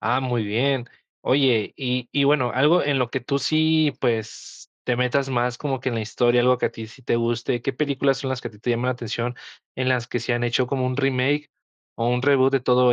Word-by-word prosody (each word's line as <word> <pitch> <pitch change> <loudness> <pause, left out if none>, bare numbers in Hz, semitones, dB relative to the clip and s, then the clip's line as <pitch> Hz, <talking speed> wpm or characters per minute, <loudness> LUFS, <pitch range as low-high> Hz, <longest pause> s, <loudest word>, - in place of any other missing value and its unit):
Ah, 125 +2 +1
muy 120 -4 -1
bien. 125 +4 0 0.3
Oye, 130 -5 +2
y 125 -2 -2
y 140 -1 +2
bueno, 140 -4 +2
algo 150 +7 +4
en 140 -2 +1
lo 120 -2 0
que 130 - -2
tú 140 +3 -1
sí, 155 +1 +2
pues, 115 -4 -3
te 120 -1 0
metas 130 +2 +1
más 120 -1 -1
como 135 -3 -2
que - - -2
en 120 - -2
la - - -1
historia, 120 +2 +2
algo 125 +1 +4
que - - +1
a - - -3
ti 110 -1 -8
sí 125 +4 -16
te 120 - 0
guste. 115 +1 -1
¿Qué 135 - -1
películas 140 -1 0
son 135 -2 -4
las 130 -1 -2
que 120 - -5
a - - -15
ti 105 - -18
te 120 - -2
llama 120 +1 0
la 130 - +2
atención? 120 0 -4 0.4
En 130 0 -1
las 125 -2 +1
que 120 - -3
se 120 - -2
han 120 0 0
hecho 120 +1 +1
como 130 -1 -1
un 130 - -2
remake, 135 +2 0 0.5
o 115 +1 0
un 125 +1 0
reboot 135 -1 +4
de 135 - +2
todo 125 0 +4
125 Hz, 250 wpm, -23 LUFS, 120-135 Hz, 0.5 s, algo